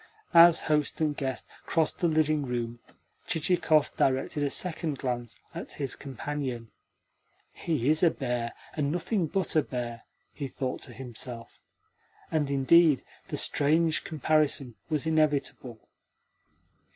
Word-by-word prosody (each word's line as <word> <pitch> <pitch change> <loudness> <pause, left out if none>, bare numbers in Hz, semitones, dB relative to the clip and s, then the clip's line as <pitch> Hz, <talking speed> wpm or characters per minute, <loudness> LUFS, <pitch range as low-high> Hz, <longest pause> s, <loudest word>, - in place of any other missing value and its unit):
As 170 0 +8
host 150 -2 0
and 155 -2 +1
guest 135 -2 -3 0.2
crossed 160 -2 +1
the 175 - +2
dining 155 -2 +2
room 120 -2 -3 0.5
Chichikov 160 -2 +2
directed 135 +3 0
a 145 - +1
second 160 -3 -1
glance 120 -3 -4
at - - -6
his 140 -3 -3
companion. 130 -3 -5 0.8
"He 150 -7 -2
is 155 +1 +4
a 175 - +6
bear, 120 -5 -3 0.2
and 145 -2 -1
nothing 175 +2 -1
but 190 0 -2
a 155 - +6
bear," 120 -4 -5 0.3
he 140 - -5
thought 130 -1 -4
to 120 - -9
himself. 120 -1 -7 0.7
And, 150 -3 0
indeed, 140 +2 +5 0.2
the - - -4
strange 160 +2 +2
comparison 150 -4 +1 0.2
was 155 -2 0
inevitable. 145 -7 0
145 Hz, 125 wpm, -28 LUFS, 130-160 Hz, 0.8 s, As